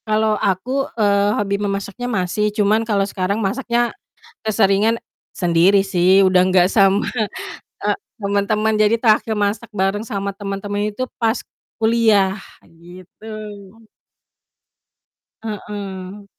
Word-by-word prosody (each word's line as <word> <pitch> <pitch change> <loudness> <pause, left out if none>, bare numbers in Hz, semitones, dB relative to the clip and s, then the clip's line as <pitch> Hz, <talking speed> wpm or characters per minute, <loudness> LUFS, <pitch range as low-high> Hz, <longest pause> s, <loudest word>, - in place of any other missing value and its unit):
Kalau 215 0 +2
aku, 255 +9 -1
eee, 205 -1 +3
hobi 200 -1 0
memasaknya 200 +4 -3
masih 210 0 0
cuman 210 +1 +3
kalau 210 -3 0
sekarang 195 0 -2
masaknya 235 +3 0 0.5
keseringan 215 +2 +2 0.3
sendiri 180 +3 +3
sih, 190 0 +3
udah 185 -1 +4
nggak 185 -1 +4
sama, 195 -1 +4 0.9
eee, - - +2 0.2
temen-temen 210 +2 0
jadi 215 +1 +3
terakhir 225 -1 +2
masak 210 +2 -2
bareng 200 +1 -1
sama 200 -4 -4
temen-temen 205 +1 -3
itu 255 +5 -4
pas 230 0 0 0.4
kuliah, 220 -4 +3 0.3
gitu. 180 +6 -13 2.1
Heeh. 200 -2 -7
205 Hz, 105 wpm, -19 LUFS, 195-220 Hz, 2.1 s, udah